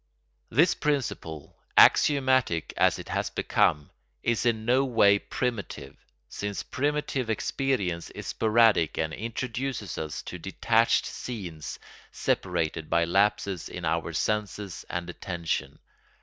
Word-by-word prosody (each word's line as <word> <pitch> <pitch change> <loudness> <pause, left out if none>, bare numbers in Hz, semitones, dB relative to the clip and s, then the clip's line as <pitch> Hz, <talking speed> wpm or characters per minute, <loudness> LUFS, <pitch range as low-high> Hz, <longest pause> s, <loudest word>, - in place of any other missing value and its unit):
This 160 +9 +4
principle, 120 - -3 0.2
axiomatic 130 - +4
as - - +3
it - - -9
has - - -1
become, 75 -1 +1 0.3
is 120 0 +1
in 110 -2 0
no 125 +3 +4
way 105 -6 +4
primitive, 100 - -4 0.3
since 100 -1 -4
primitive 145 -3 -1
experience 105 -7 -1
is - - -9
sporadic 110 -7 +3
and 80 0 -1
introduces 115 -1 -4
us 80 -1 -5
to 90 - -7
detached 115 +6 +2
scenes 90 -11 -6 0.3
separated 80 -1 -1
by 85 0 +3
lapses 100 0 +1
in - - -6
our - - 0
senses 105 -2 -2
and 85 0 -3
attention. 85 -6 -3
105 Hz, 115 wpm, -27 LUFS, 85-125 Hz, 0.3 s, This